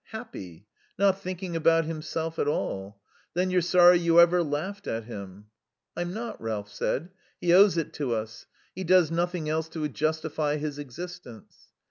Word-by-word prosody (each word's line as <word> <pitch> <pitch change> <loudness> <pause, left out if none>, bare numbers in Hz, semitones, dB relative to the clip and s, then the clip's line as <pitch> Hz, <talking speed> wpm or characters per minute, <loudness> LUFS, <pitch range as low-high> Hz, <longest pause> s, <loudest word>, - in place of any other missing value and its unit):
Happy. 105 - -9 0.3
Not 195 0 +3
thinking 185 -2 -5
about 165 0 +3
himself 160 +1 -4
at - - +1
all. 100 -8 -3 0.4
Then 185 +1 +1
you're 180 0 +3
sorry 175 0 +6
you 170 0 +4
ever 175 +1 +6
laughed 170 +6 -3
at 115 0 -2
him." 100 -3 -9 0.5
"I'm 175 0 -3
not," 225 +4 -6
Ralph 105 -2 -4
said. 165 +6 -2 0.3
"He 175 -1 +2
owes 195 0 +6
it 165 - -2
us. 115 -4 -3 0.3
He 190 - -5
does 180 -2 +4
nothing 175 -1 -1
else 160 +1 -1
to 155 -2 -3
justify 155 0 -1
his 150 -1 -4
existence." 145 -3 -10
165 Hz, 155 wpm, -27 LUFS, 140-180 Hz, 0.5 s, sorry